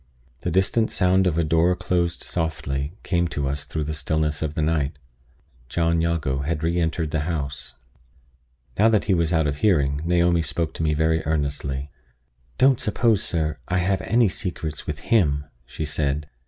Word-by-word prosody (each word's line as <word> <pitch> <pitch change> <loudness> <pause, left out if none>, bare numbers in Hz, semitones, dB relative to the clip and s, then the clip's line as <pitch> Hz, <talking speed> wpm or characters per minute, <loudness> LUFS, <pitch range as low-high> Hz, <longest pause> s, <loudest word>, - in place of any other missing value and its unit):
The - - -3
distant 95 +6 +2
sound 95 0 +2
of 85 -2 0
a 85 - +3
door 80 +3 +3
closed 85 -1 -1
softly 75 -3 -2
came 85 -2 +1
to 70 -4 -2
us 70 +1 -3
through 80 - -3
the 75 +1 -3
stillness 75 -1 -1
of 80 -1 -2
the - - 0
night. 75 -3 0 0.7
John 85 +1 +1
Jago 80 -5 0
had 75 +2 -2
re 85 +2 +1
entered 80 -1 -1
the 80 - 0
house. 70 -6 -4 1.0
Now 110 +2 +6
that 110 -2 +2
he 100 - +2
was 85 -2 +1
out 80 -2 +2
of 70 -1 -1
hearing, 70 -7 +2
Naomi 85 0 +3
spoke 80 0 -1
to - - -5
me 75 -1 +2
very 80 +1 +1
earnestly: 70 -2 -2 0.7
"Don't 130 +1 +4
suppose, 110 -1 +2
sir, 80 -4 -1
I 90 - 0
have 95 +1 +1
any 115 +3 +3
secrets 90 -7 -4
with 75 - -3 0.2
him," 75 -10 +3 0.2
she 80 - -4
said. 75 0 -1
80 Hz, 175 wpm, -23 LUFS, 75-90 Hz, 1.0 s, Now